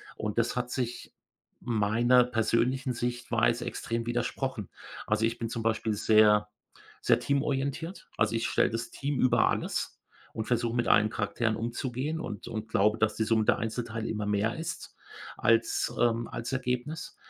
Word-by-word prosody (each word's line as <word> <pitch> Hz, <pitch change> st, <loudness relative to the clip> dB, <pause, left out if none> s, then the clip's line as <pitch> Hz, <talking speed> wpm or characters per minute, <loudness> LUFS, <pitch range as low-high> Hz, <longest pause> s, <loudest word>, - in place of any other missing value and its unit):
Und, 105 Hz, +1 st, -4 dB
das 115 Hz, -, +1 dB
hat 125 Hz, 0 st, -2 dB
sich 120 Hz, -2 st, -4 dB, 0.5 s
meiner 120 Hz, +2 st, +3 dB
persönlichen 125 Hz, +3 st, +1 dB
Sichtweise 120 Hz, 0 st, 0 dB
extrem 115 Hz, -1 st, -3 dB
widersprochen. 120 Hz, -2 st, -2 dB, 0.4 s
Also, 105 Hz, +1 st, +2 dB
ich 115 Hz, +1 st, -1 dB
bin 115 Hz, -1 st, -3 dB
zum 115 Hz, -, -3 dB
Beispiel 110 Hz, -1 st, 0 dB
sehr, 105 Hz, 0 st, +5 dB, 0.5 s
sehr -, -, +3 dB
teamorientiert. 140 Hz, +5 st, -2 dB
Also, -, -, +2 dB
ich 115 Hz, -, 0 dB
stelle -, -, +2 dB
das 115 Hz, +1 st, -4 dB
Team 140 Hz, 0 st, -3 dB
über 120 Hz, -2 st, +4 dB
alles -, -, -2 dB, 0.3 s
und 110 Hz, 0 st, -4 dB
versuche 120 Hz, -1 st, 0 dB
mit 120 Hz, -, +1 dB
allen 105 Hz, 0 st, +5 dB
Charakteren 110 Hz, +1 st, -1 dB
umzugehen 125 Hz, +6 st, -3 dB
und 105 Hz, -4 st, -6 dB
und 110 Hz, -2 st, -4 dB
glaube 105 Hz, 0 st, +2 dB
dass 110 Hz, -1 st, +2 dB
die -, -, -1 dB
Summe 110 Hz, 0 st, +2 dB
der -, -, +3 dB
Einzelteile 115 Hz, 0 st, -3 dB
immer 105 Hz, -1 st, -2 dB
mehr 105 Hz, +2 st, 0 dB
ist 165 Hz, -, -6 dB, 0.4 s
als 115 Hz, 0 st, +2 dB
ähm, 120 Hz, -1 st, +2 dB
als 115 Hz, +2 st, -5 dB
Ergebnis. 130 Hz, +5 st, -3 dB
115 Hz, 155 wpm, -29 LUFS, 110-125 Hz, 0.5 s, sehr